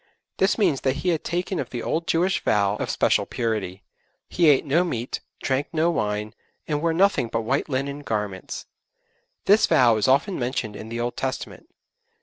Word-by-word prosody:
This 190 +1 +2
means 175 - +2
that 130 0 +1
he - - +3
had 165 -3 0
taken 180 +1 -2
the 120 -2 -5
old 165 +1 -2
Jewish 180 +3 +1
vow 100 -1 +2
of - - -3
special - - +2
purity; 105 -5 -3 0.4
he 170 -3 +3
ate 145 +1 +4
no 155 +5 +3
meat, 125 -8 -3 0.2
drank 135 +1 0
no 165 +1 +2
wine, 105 -6 -2 0.3
and 150 -1 -1
wore 165 0 +2
nothing 185 -6 +3
but 115 0 -2
white 135 +7 -1
linen 140 +1 -2
garments. 105 -8 -4 0.8
This 205 +3 +5
vow 120 -3 +5
is 110 - +1
often 140 +9 +2
mentioned 120 -4 -2
in 110 +2 -8
the 115 +1 -4
Old 120 +1 -2
Testament. 130 0 -5
135 Hz, 175 wpm, -24 LUFS, 115-165 Hz, 0.8 s, This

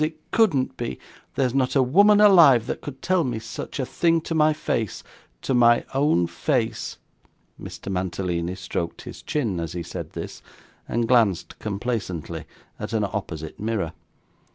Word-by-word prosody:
It 155 0 -5
couldn't 175 - +2
be. 65 - -4 0.4
There's 130 -3 +1
not 135 0 +1
a 135 - +5
woman 200 +11 +5
alive, 165 - +7
that - - -4
could 135 -2 -9
tell 185 -2 +2
me 125 -5 -2
such 115 +5 -7
a 130 - 0
thing 165 +5 +2
to 165 - -4
my 155 -1 +4
face 115 -8 -2 0.4
to - - 0
my 120 -1 +5
own 135 - +3
face.' 85 0 -2 0.6
Mr. 100 - -7
Mantalini 90 -1 -2
stroked 85 -2 -4
his - - -9
chin, 115 - -1
as 85 -1 -4
he 85 -1 -4
said - - -7
this, - - -7 0.5
and 115 0 0
glanced 110 -8 +2
complacently 100 -5 -4 0.3
at - - -5
an 110 -2 +1
opposite 90 -6 -5
mirror. 105 -6 -2
120 Hz, 155 wpm, -24 LUFS, 95-145 Hz, 0.6 s, alive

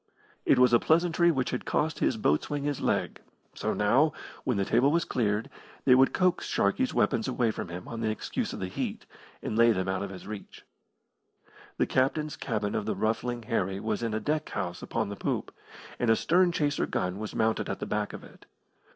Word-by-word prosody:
It - - +5
was 125 -1 +5
a 120 - +7
pleasantry 170 +3 +3
which 135 -6 0
had 125 - -3
cost 160 +1 0
his 120 - +1
boatswain 125 - 0
his 145 -2 -2
leg, - - -1 0.3
so - - -2
now, 130 +9 +3 0.3
when 125 -5 0
the 100 - +1
table 125 +7 +3
was 170 +1 +2
cleared, 110 -7 0 0.4
they 130 - +7
would 130 +1 +5
coax 185 -1 +1
Sharkey's 100 0 +1
weapons - - +1
away 115 -2 +1
from - - -5
him 90 +1 -7
on 115 -1 -5
the 110 - 0
excuse 110 - -3
of - - -6
the 95 - -2
heat, 90 - -4 0.4
and - - -3
lay 115 +1 +6
them 95 -2 -2
out 95 -1 -1
of 100 - -3
his 95 -1 -9
reach. 105 -1 -9 1.1
The - - +3
captain's 145 +3 0
cabin 105 -7 -2
of 105 - -2
the - - 0
Ruffling 115 +2 -1
Harry 95 -3 -1
was 110 +1 -2
in 115 -2 -1
a - - 0
deck 150 +4 -1
house 90 0 -4
upon - - -2
the 100 - -5
poop, - - -3 0.5
and 120 - +1
a 115 - +6
stern 175 +7 +3
chaser 145 -4 0
gun 90 +2 -2
was 110 -1 -5
mounted 110 0 +1
at - - -2
the - - -3
back 105 -1 -2
of - - -9
it. - - -16
115 Hz, 210 wpm, -28 LUFS, 105-145 Hz, 1.1 s, a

